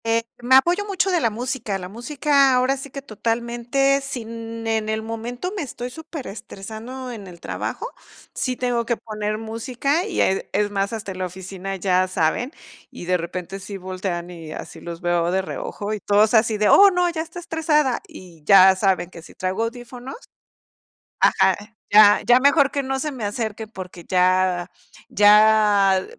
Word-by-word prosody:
Eh, 230 0 +1 0.2
me 250 +2 +4
apoyo 345 +9 +4
mucho 390 -1 0
de 350 -2 +2
la 230 - +2
música. 235 -2 -3
La 180 -1 -7
música, 275 +5 +2
ahora 255 +2 +2
sí 275 +1 -8
que, 275 +1 -8
totalmente, 240 +4 0
sin 230 -3 -7
en 220 -1 -1
el 220 0 -2
momento 240 - -5
me 395 - -3
estoy 250 -3 -6
superestresando 250 - -8
en 210 -5 -9
el 175 -2 -12
trabajo, - - -4 0.5
sí 255 -1 -2
tengo 245 -1 -1
que 235 - 0
poner 215 -1 -4
música, 245 +8 -2
y, 405 - -3
eh, 190 - 0
es 205 0 +1
más, 200 +1 -1
hasta 215 -3 -5
en 185 - -8
la 185 - -1
oficina 190 +1 -7
ya 185 0 +1
saben, 185 - 0 0.4
y - - -10
de 180 +1 +2
repente 180 +3 -6
sí 195 +1 -7
voltean, 185 -2 -5
y 165 -3 -9
así - - -9
los 170 0 -7
veo 175 -1 +1
de 190 +1 0
reojo, 205 +2 -5
y 215 - -3
todos 210 +3 +3
así 220 -1 +3
de: 210 0 +2
"Oh, 400 0 +8
no, 360 -1 +1
ya 320 -1 -3
está 330 +2 -9
estresada". 300 -6 +1
Y 170 -4 -14
ya 190 +2 +7
saben 190 -2 0
que 170 - -11
si - - -15
traigo 185 +4 -2
audífonos 245 +2 -8 1.1
ajá, - - +4 0.4
ya 210 0 +7
ya 245 +3 +6
mejor 280 0 +5
que 280 - -2
no 265 0 -2
se 300 +2 -2
me 250 -6 -5
acerque, 220 +1 -4
porque, 180 -4 -10
ya 185 -1 +2 0.4
ya 210 -2 +5
220 Hz, 175 wpm, -22 LUFS, 190-255 Hz, 1.1 s, Oh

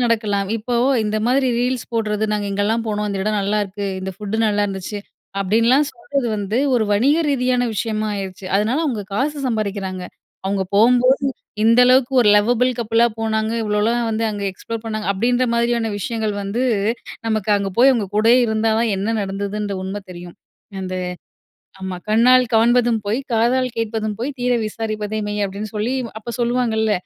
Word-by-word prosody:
நடக்கலாம். 210 -4 0
இப்போ 230 +3 -3 0.3
இந்த 210 0 -1
மாதிரி 260 +2 +2
ரீல்ஸ் 250 0 -1
போடுறது, 215 -2 0
"நாங்க 210 -1 -1
இங்கல்லாம் 210 +3 0
போனோம். 210 -1 -1
இந்த 200 -1 -3
இடம் 210 +1 0
நல்லாயிருக்கு. 205 0 -2
இந்த 190 +1 -4
ஃபுட்டு 210 +1 -4
நல்லாயிருந்துச்சு." 205 -1 -1 0.4
அப்படீன்லாம் 230 +8 +3
சொல்றது 280 -7 -3
வந்து, 205 +3 -1 0.2
ஒரு 230 -3 +2
வணிக 265 +10 +3
ரீதியான 250 -2 +1
விஷயமா 215 0 -1
ஆயிருச்சு. 190 -1 -6
அதனால 220 +7 +1
அவுங்க 240 -9 -2
காசு 290 +7 0
சம்பாரிக்கிறாங்க. 200 -5 -2 0.4
அவங்க 195 0 0
போம்போது, 250 +5 +4 0.4
"இந்த 230 +2 +5
அளவுக்கு 255 +1 +4
ஒரு 225 - +4
லவபிள் 245 +4 +3
கப்பிளா 230 0 +3
போனாங்க. 220 0 0
இவ்வளோலாம் 220 +3 0
வந்து 225 +1 -1
அங்க 205 -1 -5
எக்ஸ்ப்ளோர் 230 +4 -7
பண்ணாங்க." 215 -2 -3
அப்படீன்ற 245 +5 +1
மாதிரியான 235 -1 +1
விஷயங்கள் 220 +1 -2
வந்து, 210 +6 -1 0.6
நமக்கு 215 -2 -1
அங்க 200 -1 -3
போய் 265 +3 +7
அவங்க 220 -6 -1
கூடயே 225 +4 +5
இருந்தா 220 0 +1
தான், 230 -2 +1
என்ன 200 +3 -2
நடந்ததுன்ற 200 +1 -3
உண்மை 195 +2 -4
தெரியும். 175 -1 -10 0.4
அந்த 185 -1 -4 0.9
ஆமா, 190 -1 -4
"கண்ணால் 250 +4 +5
காண்பதும் 235 +1 +4
பொய். 215 +5 0
காதால் 245 +3 +2
கேட்பதும் 220 -1 -2
பொய். 255 +5 -2
தீர 250 0 +1
விசாரிப்பதே 215 -1 -3
மெய்." 210 0 -2
அப்படீன்னு 200 +2 -6
சொல்லி, 215 +5 -1 0.2
அப்ப 220 +2 -7
சொல்லுவாங்கல்ல. 235 -2 +1
220 Hz, 155 wpm, -20 LUFS, 205-240 Hz, 0.9 s, போய்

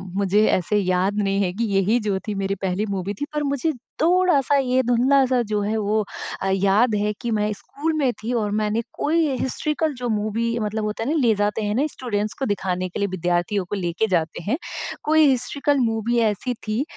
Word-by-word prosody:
मुझे 200 +2 +3
ऐसे 190 +4 +1
याद 185 +1 +1
नहीं 195 0 +1
है 180 - 0
कि 230 +4 -2
यही 205 +5 +3
जो 205 -3 -1
थी 210 - -1
मेरी 195 0 -1
पहली 190 +3 -1
मूवी 195 +1 -2
थी - - +1
पर 300 0 -1
मुझे 280 +3 0 0.3
थोड़ा-सा 340 -5 +3
ये 260 -1 +2
धुंधला-सा 255 +1 +3
जो 210 -1 0
है 215 +2 -1
वो 215 0 +1 0.4
अ, 195 - 0
याद 200 +4 +3
है 210 +1 +1
कि 235 -2 -2
मैं 210 0 +1
स्कूल 305 +9 -4
में 270 -5 +2
थी 235 - -2
और 210 -3 0
मैंने 215 +2 0
कोई 320 +1 +1
हिस्टॉरिकल 305 +3 -1
जो 245 -1 -4
मूवी 220 +2 -1
मतलब 215 0 -2
होता 210 +1 -3
है 260 - -2
ना 320 - +1
ले 235 -5 +4
जाते 205 +2 0
हैं 210 0 -1
ना 275 +5 +2
स्टूडेंट्स 215 -7 -2
को 270 - 0
दिखाने 185 -3 -1
के 195 - -6
लिए, 200 - +1
विद्यार्थियों 180 +2 -1
को 205 - -4
लेके 185 +3 -1
जाते 170 -3 -1
हैं। 230 - 0 0.5
कोई 315 0 +4
हिस्टॉरिकल 280 +3 +1
मूवी 225 +1 0
ऐसी 225 +3 0
थी 220 +6 0
215 Hz, 205 wpm, -23 LUFS, 200-255 Hz, 0.5 s, ले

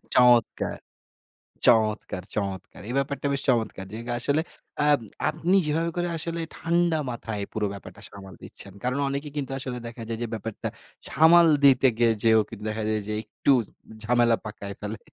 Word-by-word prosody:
চমৎকার! 120 -2 +4 0.9
চমৎকার, 110 -5 +2
চমৎকার! 95 -3 -4
এই - - -3
ব্যাপারটা 140 +1 -1
বেশ 140 - -1
চমৎকার! 115 -5 0
যে - - -4
গা 120 - -1
আসলে 145 +5 +1 0.5
আম 145 -1 +5 0.3
আপনি 165 +4 +1
যেভাবে 165 +3 0
করে 175 0 0
আসলে 170 +1 -3
ঠান্ডা 170 0 +1
মাথায় 110 -3 -4
পুরো 110 -1 -1
ব্যাপারটা 100 -4 -11
সামাল 95 -1 -11
দিচ্ছেন। 100 - -8
কারণ 125 +3 0
অনেকে 140 +2 -3
কিন্তু 135 -2 -3
আসলে 130 -1 -4
দেখা 115 0 -8
যায় 115 -1 -3
যে - - -2
ব্যাপারটা 110 -1 -4 0.4
সামাল 165 +3 +6 0.2
দিতে 135 -1 +6
গিয়ে 120 -1 +4
যেয়েও 110 -1 +6
কিন্তু 110 -2 -9
দেখা 110 0 -3
যায় 110 -1 0
যে, 105 - -2
একটু 110 +6 0 0.2
জ - - -18 0.3
ঝামেলা 120 0 +3
পাকায় 100 -2 -6
ফেলে। 105 +1 -4
120 Hz, 165 wpm, -26 LUFS, 110-145 Hz, 0.9 s, সামাল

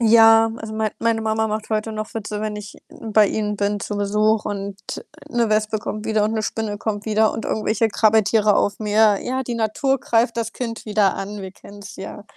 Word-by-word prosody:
Ja, 225 0 +6
also 220 -1 -7
mein 220 -1 -1
meine 230 -1 +1
Mama 220 0 0
macht 215 +1 -4
heute 215 +1 -1
noch 215 0 -6
Witze, 210 -1 -4
wenn 215 -1 -3
ich 210 -1 -8
bei 215 -2 +2
ihnen 210 -1 -2
bin 205 0 -1
zu 205 - -4
Besuch 210 +2 +1
und, 200 -1 -4 0.2
äh, - - -6 0.3
'ne 235 -2 +1
Wespe 215 0 +1
kommt 210 +1 -5
wieder 215 -1 +1
und 215 +2 0
'ne 220 - -1
Spinne 210 -2 -3
kommt 210 -2 -3
wieder 220 0 +2
und 225 - -5
irgendwelche 220 +1 0
Krabbeltiere 215 -1 +3
auf 200 - +1
mir. 210 -1 +3
„Ja, 260 +1 -2
die 240 -2 -4
Natur 260 +5 0
greift 230 0 +1
das 230 -1 -2
Kind 230 -3 -5
wieder 210 -2 +2
an. 200 +1 -5
Wir 190 - -6
kennen's 205 +2 -12
ja.“ 195 +2 -8
215 Hz, 210 wpm, -21 LUFS, 210-225 Hz, 0.3 s, Ja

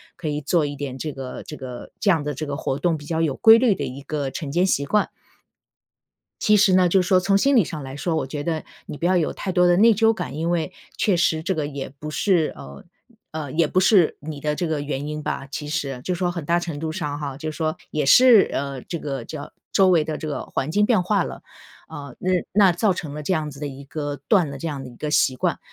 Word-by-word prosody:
可 160 - -6
以 150 0 -2
做 155 +1 +1
一 145 - -4
点 135 -2 -5
这 155 +2 -4
个 135 -1 -7
这 150 - -8
个 125 -3 -8
这 205 - +1
样 160 -5 +3
的 150 0 -3
这 155 +4 -5
个 140 0 -3
活 135 -2 -2
动， 165 +1 +1
比 145 - -12
较 160 +1 -1
有 150 -5 0
规 225 +1 +7
律 240 -6 +3
的 - - -4
一 135 +2 -7
个 140 -1 -3
晨 145 -2 -5
间 175 +4 +2
习 140 -6 +1
惯。 210 +7 +1 1.3
其 210 0 +4
实 195 -2 +4
呢， 180 -1 +4
就 190 +1 +4
是 180 - -3
说 185 - +5
从 195 +2 +2
心 275 +6 +3
理 225 - +6
上 155 -2 -6
来 135 +1 -7
说， 160 +2 -2
我 145 - -1
觉 145 +1 -5
得 160 -1 -2 0.2
你 - - -7
不 170 - -3
要 185 0 +3
有 160 - 0
太 190 - -4
多 180 0 +3
的 175 0 +4
内 225 +2 +6
疚 225 +2 +3
感。 135 - -5
因 165 +2 -2
为 175 +1 -1 0.2
确 200 -4 +2
实 165 -2 +1
这 185 +3 -1
个 150 -2 -1
也 140 -2 -6
不 150 - -6
是， 175 -3 +1
呃 70 +1 -11 0.5
呃 155 -4 -5
也 160 -1 +2
不 185 - +1
是 190 -3 +4
你 150 -1 -7
的 150 0 -1
这 175 - -2
个 155 -2 -1
原 145 0 -4
因 150 0 -5
吧， 135 - -3
其 150 +2 -5
实 135 -4 -3
就 180 - -1
是 175 - -5
说 180 -1 +1
很 170 -4 -6
大 170 +2 +2
程 165 -4 -5
度 160 0 -3
上 145 -2 -3
哈。 140 -2 -5
就 155 +1 -4
是 - - -11
说 155 -1 -1
也 150 -2 -1
是， 240 - +7
呃 140 -2 -3
这 170 - -5
个 135 -5 -4
叫 150 +3 -8 0.2
周 190 -1 +4
围 170 -4 +4
的 155 0 -4
这 155 - -6
个 145 - -3
环 135 - -3
境 210 +3 +3
变 220 -6 +3
化 195 0 +1
了， - - -7 0.5
啊， 140 -3 -9
那 185 - -1 0.2
那 195 -2 +5
造 200 +4 +2
成 155 -5 -6
了 150 0 -6
这 185 - 0
样 155 -3 -1
子 140 0 -11
的 145 - -3
一 140 0 -9
个 145 0 -4
断 175 -8 +3
了 140 - -7
这 165 - -4
样 140 -3 -5
的 125 - -8
一 120 - -14
个 150 -1 -4
习 130 -3 +3
惯。 - - -1
155 Hz, 290 characters per minute, -23 LUFS, 145-180 Hz, 1.3 s, 规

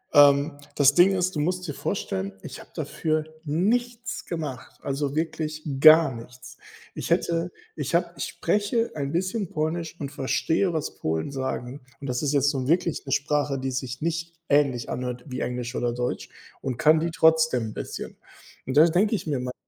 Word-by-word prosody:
ähm, 145 +1 +6 0.2
das 145 -1 +5
Ding 180 +3 +7
ist, 180 0 0
du 150 - -1
musst 180 +3 -1
dir 150 - -3
vorstellen, 95 -6 -3
ich - - -8
habe - - -13
dafür 155 -1 -1 0.2
nichts 235 +10 -1
gemacht, 155 -6 -5
also 140 0 -2
wirklich 155 -1 -2 0.2
gar 155 -1 +8
nichts. 125 +2 -11 0.4
Ich - - -5
hätte 170 +1 +1 0.2
ich - - -2
habe - - +1
ich - - -2
spreche 210 +3 0
ein 140 -2 -2
bisschen 185 +3 -1
Polnisch 160 +2 -2
und 140 -2 -4
verstehe, 160 +7 +1
was 160 -3 -3
Polen 80 - -2
sagen. 130 0 -4 0.2
Und 140 - -8
das 125 -1 -1
ist 145 -1 +1
jetzt 140 0 +3
so 130 -3 -3
wirklich 170 +1 +1
'ne - - -4
Sprache, 145 0 +1
die 130 0 -2
sich 130 0 -4
nicht 165 +1 -2
ähnlich 140 -4 +2
anhört 125 -1 -4
wie 130 -1 -5
Englisch 125 0 -3
oder 120 -1 0
Deutsch, 125 0 -3 0.3
und 125 -3 -3
kann 155 +1 +5
die 165 +2 0
trotzdem 160 -8 +3
'n - - -10
bisschen. - - -6 0.5
Und 130 +2 -1
da 155 - +9
denke 195 +6 +2
ich 190 - -4
mir 140 -4 0
manchmal: 125 0 -4
150 Hz, 185 wpm, -25 LUFS, 130-165 Hz, 0.5 s, da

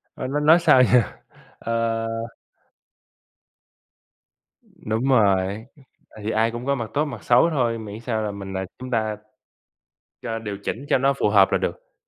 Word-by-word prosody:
Ơ, - - -5
nói 145 +3 -1
nói 160 +3 +6
sao 130 -6 +5
giờ? 125 -1 +5 0.6
Ờ 115 0 -1 2.7
Đúng 110 +5 -2
rồi, 100 -2 +2 0.5
tại 110 - -12
vì 110 - -1
ai 110 +1 +1
cũng 120 +2 -7
có 140 - +2
mặt 115 -5 -5
tốt, 150 +2 +2
mặt 145 - -8
xấu 125 +8 +4
thôi, 120 -7 0
miễn 105 0 -8
sao 115 -2 -2
là 105 - -2
mình, 100 -1 -7
à 95 - -2
chúng 130 0 -8
ta 110 -3 -1 1.1
cho 115 -1 -4
điều 105 -3 -5
chỉnh 135 +5 -4
cho - - +4
nó 135 +2 +2
phù 105 - 0
hợp 100 -2 +5
là - - +3
được. - - -5
115 Hz, 170 wpm, -23 LUFS, 110-130 Hz, 2.7 s, nói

